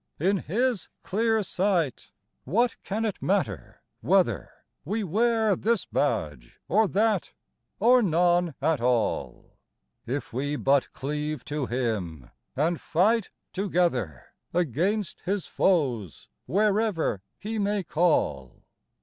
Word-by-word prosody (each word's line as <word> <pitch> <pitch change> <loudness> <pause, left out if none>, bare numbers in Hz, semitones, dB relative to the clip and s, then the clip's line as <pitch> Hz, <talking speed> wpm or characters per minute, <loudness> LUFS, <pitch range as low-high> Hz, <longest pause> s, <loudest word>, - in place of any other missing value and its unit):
In 190 +6 +2
His 225 - -1
clear 220 +2 +1
sight 180 -8 0 0.4
what 230 - +1
can 220 +3 -2
it 210 - -3
matter 120 - -2 0.2
whether - - +2 0.3
We 210 +7 -2
wear 220 +2 +2
this 225 +2 0
badge 65 -5 -2
or 215 +4 +3
that, 210 -1 +1 0.5
or 245 +4 +5
none 175 - +2
at 160 -6 +2
all, 120 -3 -1 0.5
If 135 +1 -4
we 145 +4 -1
but 140 -1 +2
cleave 150 +2 -4
to 145 -3 -3
Him, 105 - -3 0.2
and 160 +4 0
fight 205 +6 +2 0.2
together 165 - 0 0.3
Against 180 - 0
His 195 -1 0
foes, 125 - 0 0.2
wherever 205 - +1 0.2
He 220 +1 -4
may 205 -1 0
call 150 - 0
175 Hz, 110 wpm, -26 LUFS, 135-210 Hz, 0.5 s, or